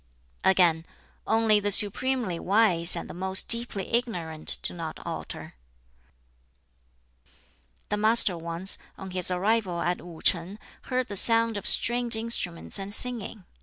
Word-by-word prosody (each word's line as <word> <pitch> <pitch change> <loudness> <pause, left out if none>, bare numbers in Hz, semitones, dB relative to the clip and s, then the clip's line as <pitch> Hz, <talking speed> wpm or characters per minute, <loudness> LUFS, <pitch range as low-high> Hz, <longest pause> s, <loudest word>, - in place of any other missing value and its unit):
Again, 175 -3 +1 0.4
"Only 220 -1 +1
the 205 0 -3
supremely 210 -1 +1
wise 185 -4 +3
and - - -7
the - - -11
most 190 +1 -1
deeply 230 -5 +3
ignorant 175 -10 -2
do - - +2
not 165 -2 -8
alter." - - -9 2.4
The 210 - -3
Master 215 -3 +5
once, 170 +3 +1 0.2
on 190 -1 -10
his 180 -1 +2
arrival 185 -1 -2
at 175 +1 -3
Wu 170 -2 -13
shing, 180 +4 0 0.3
heard 255 -1 -3
the 205 - -8
sound 230 +2 +4
of 205 - -5
stringed 240 0 +1
instruments 220 -6 -5
and 195 +1 -8
singing. 225 -3 -1
195 Hz, 130 wpm, -24 LUFS, 175-230 Hz, 2.4 s, Master